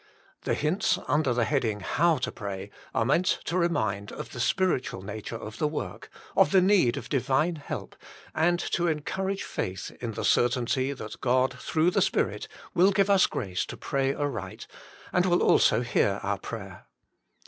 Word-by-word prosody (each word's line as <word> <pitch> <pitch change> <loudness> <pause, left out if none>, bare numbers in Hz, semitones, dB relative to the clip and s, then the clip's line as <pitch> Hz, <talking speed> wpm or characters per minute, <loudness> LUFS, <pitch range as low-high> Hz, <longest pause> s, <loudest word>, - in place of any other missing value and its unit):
The - - +1
hints 160 +7 +1
under 145 -1 +2
the 120 -1 +1
heading 115 -8 0
How 165 - +2
to - - -1
Pray 100 -1 -6 0.2
are 115 - +1
meant 170 +8 +2
to 170 - -2
remind 110 - 0
of - - -7
the 120 - -8
spiritual 130 - 0
nature 105 +3 -6
of 110 -1 -8
the 150 - +2
work, 145 - -5 0.3
of - - +5
the 190 - +5
need 185 -10 +4
of - - -6
Divine 150 +5 +1
help, 145 - -6 0.4
and 175 +2 +2
to 175 0 0
encourage 190 +5 -2
faith 95 +1 -4
in 115 -2 -3
the 110 - -3
certainty 125 +2 +2
that 125 -6 -8
God, 130 +1 +2
through 160 +6 +1
the - - +2
Spirit, - - 0 0.3
will 185 +3 +5
give 200 +1 +2
us 195 -2 +5
grace 95 -6 -2
to - - -7
pray 135 -1 0
aright, 145 -4 -4 0.5
and 180 +1 +3
will 175 -1 +3
also 110 - +4
hear 100 -4 +1
our 100 0 -1
prayer. 100 -6 -8
135 Hz, 170 wpm, -27 LUFS, 110-170 Hz, 0.5 s, of